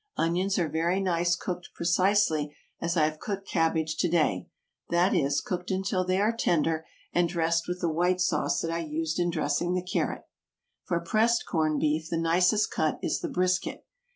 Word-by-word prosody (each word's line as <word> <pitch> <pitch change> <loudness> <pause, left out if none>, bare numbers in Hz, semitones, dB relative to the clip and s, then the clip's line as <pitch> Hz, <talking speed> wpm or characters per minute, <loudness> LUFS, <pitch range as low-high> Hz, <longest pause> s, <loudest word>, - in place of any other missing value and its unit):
Onions 180 +4 +1
are 175 -3 +1
very 165 +5 0
nice 175 -2 +1
cooked 180 -1 -5
precisely 170 -4 +2 0.3
as 170 +1 -1
I 155 - +4
have 155 0 -3
cooked 200 -2 -5
cabbage 160 -2 0
to 175 - +1
day; 155 - +1 0.4
that 175 +2 +3
is, 140 +1 +1
cooked 180 -1 -4
until 190 -1 0
they 185 +1 0
are 215 +3 +2
tender, 165 -6 0 0.3
and 175 -1 +2
dressed 165 -1 0
with 180 0 -4
the 175 - +1
white 180 +3 +1
sauce 175 -4 +1
that 165 - -2
I 165 - -1
used 160 +1 -2
in 175 0 +1
dressing 170 +2 0
the 180 0 -2
carrot. 180 - -2 0.6
For 170 -2 0
pressed 225 +7 +2
corn 155 -2 0
beef 155 +1 0
the 165 - -1
nicest 180 +5 +2
cut 155 - 0
is - - 0
the - - -4
brisket. 185 +1 -1
170 Hz, 180 wpm, -28 LUFS, 160-185 Hz, 0.6 s, I